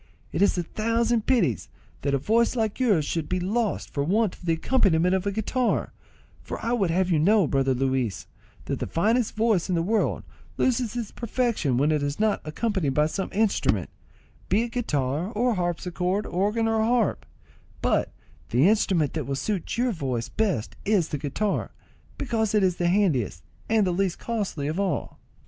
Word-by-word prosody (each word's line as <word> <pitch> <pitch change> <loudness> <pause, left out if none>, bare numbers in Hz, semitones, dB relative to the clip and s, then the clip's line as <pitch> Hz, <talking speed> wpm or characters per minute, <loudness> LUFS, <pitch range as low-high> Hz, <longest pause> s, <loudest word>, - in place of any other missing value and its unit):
It - - -2
is 200 - +3
a 175 - 0
thousand 230 +4 0
pities 170 - +1 0.3
that 140 0 +1
a - - +3
voice 230 - +2
like 220 -2 -1
yours 205 - +3
should 160 -1 -2
be 185 - 0
lost 210 +4 -1
for 140 - 0
want 205 +5 +1
of 180 - -13
the 165 - +3
accompaniment 180 -2 +2
of 190 - +2
the 200 - 0
guitar; 225 +4 -1 0.5
for - - -6
I 235 - +1
would 200 -7 +1
have 185 +2 +1
you 160 - +3
to - - +2
know, 205 +1 +5
brother 135 -2 +1
Luis, 130 -5 -1 0.4
that - - -3
the - - -3
finest 220 +7 +1
voice 215 -6 +1
in 180 - +1
the 165 - +1
world 215 +4 0 0.3
loses 245 -3 +1
its 235 -4 -4
perfection 235 - -1
when 145 +4 +3
it 150 -1 +1
is 145 +3 -2
not 215 -1 +1
accompanied 155 - -1
by 150 - +4
some 190 +5 -3
instrument, 215 0 +1 0.6
be 220 - +3
it 235 - -5
guitar 155 - -1
or 245 +3 +1
harpsichord, 180 +2 -1
organ 210 +5 0
or 225 0 +1
harp; 230 0 +1 0.6
but - - +1 0.4
the 130 +8 +4
instrument 190 -8 +2
that 155 -4 -3
will 140 - -1
suit 200 +7 -3
your 245 +1 +2
voice 130 - -3
best 195 - -1
is 195 -6 +2
the 150 - -3
guitar, 175 +9 -1 0.5
because 220 -4 -1
it 210 - +4
is 180 -2 +2
the 175 -1 +1
handiest 150 - +1 0.3
and 220 -2 +3
the 180 - +1
least 185 0 0
costly 205 -11 -3
of 160 +5 -2
all." 190 -7 -2
190 Hz, 185 wpm, -25 LUFS, 155-220 Hz, 0.6 s, know